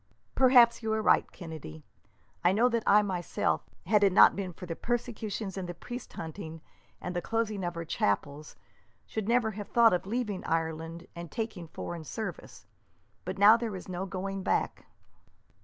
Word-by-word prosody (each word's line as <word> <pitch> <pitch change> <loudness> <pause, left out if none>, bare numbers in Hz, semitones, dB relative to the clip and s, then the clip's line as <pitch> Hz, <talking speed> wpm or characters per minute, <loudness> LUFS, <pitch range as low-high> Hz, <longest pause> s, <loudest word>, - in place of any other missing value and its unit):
"Perhaps 245 -3 +6
you 220 -1 -2
are 220 - 0
right, - - +3
Kennedy. 155 - -9 0.6
I 175 +2 +4
know 235 +5 +4
that 230 -1 0
I 210 +1 +6
myself, 180 -4 -1 0.2
had 205 +2 +3
it 200 - +5
not - - +7
been 195 -2 -3
for 180 - -10
the 165 -2 -4
persecutions 225 -4 -3
and 180 -2 -5
the 175 - -5
priest 245 +8 -8
hunting, 160 -1 -7 0.4
and 180 - -5
the 175 - 0
closing 215 -1 -1
of 175 -1 -3
our 170 - -4
chapels, 145 +4 -1 0.5
should 215 -2 -4
never 235 -1 +2
have 205 -1 -7
thought 230 -3 +5
of 180 +1 -1
leaving 215 -3 -2
Ireland 165 +1 -2
and 170 -1 -7
taking 220 -3 -4
foreign 165 +1 -6
service. 220 - -7 0.6
But - - -4
now 210 +3 +8
there 230 -4 -3
is 185 - -8
no 185 +1 -4
going 195 +1 -4
back." - - -1
195 Hz, 175 wpm, -29 LUFS, 170-225 Hz, 0.6 s, now